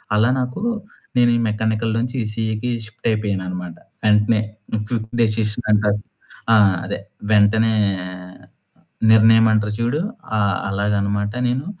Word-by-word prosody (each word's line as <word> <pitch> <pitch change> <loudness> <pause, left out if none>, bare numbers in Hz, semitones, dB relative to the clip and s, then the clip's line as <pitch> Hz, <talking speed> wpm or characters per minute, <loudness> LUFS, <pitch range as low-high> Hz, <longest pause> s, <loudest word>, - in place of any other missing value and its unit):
అలా 110 +3 +3
నాకు 125 +8 -3 0.6
నేను 120 -1 +5
ఈ - - 0
మెకానికల్ 110 +1 -1
నుంచి 125 +2 -3
ఈ - - -1
ఈసీఈకి 110 +2 -3 0.2
షిఫ్ట్ 110 +2 -7
అయిపోయాను 105 -3 -1
అనమాట. 90 -2 -6 0.3
వెంటనే 105 +1 +3 0.5
క్విక్ 110 -2 -3
డెసిషన్ 110 +1 0
అన్నట్టు. 105 -1 +2 0.5
ఆహ్, 100 -3 +5
అదే 100 +2 -4 0.3
వెంటనే 110 +2 +4 1.4
నిర్ణయం 110 +1 +6
అంటారు 105 -1 0
చూడు. 120 +7 0 0.4
ఆ! - - +1 0.3
అలాగనమాట 100 +1 -1
నేను 130 +4 -1
110 Hz, 120 wpm, -20 LUFS, 105-115 Hz, 1.4 s, నిర్ణయం